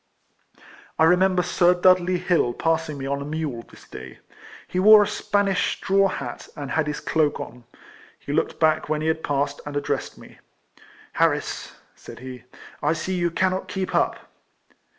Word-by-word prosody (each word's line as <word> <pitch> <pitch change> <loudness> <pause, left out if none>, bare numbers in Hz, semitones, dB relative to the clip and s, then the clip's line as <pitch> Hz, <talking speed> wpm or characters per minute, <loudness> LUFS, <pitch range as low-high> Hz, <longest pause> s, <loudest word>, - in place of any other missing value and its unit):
I 160 - +5
rememher 180 +1 +3
Sir 180 0 +3
Dudley 185 0 +3
Hill 175 -9 +1
passing 160 -1 -1
me 135 - -5
on 140 +1 -2
a - - -3
mule 150 -5 -4
this - - -17
day. 65 0 -10 0.5
He 180 - -2
wore 210 +2 +8
a - - -2
Spanish 200 -3 0
straw 195 0 +2
hat, 130 -10 -6
and 145 -2 -6
had 160 -1 0
his 150 - -3
cloak 155 -2 0
on. 125 -1 -9 0.5
He 140 - -6
looked 155 - -1
back 155 -2 +2
when 155 0 0
he 155 - -1
had 160 0 0
passed, 140 0 -1
and 145 0 -5
addressed 145 - -3
me. - - -15 0.4
" - - -24
Harris," - - 0 0.2
said - - -12
he, 125 -1 -10 0.2
" - - -19
I 150 +2 +2
see 165 +3 -3
you 175 -1 0
cannot 185 +2 -1
keep 190 -1 -4
up." - - +2
160 Hz, 175 wpm, -23 LUFS, 145-185 Hz, 0.5 s, wore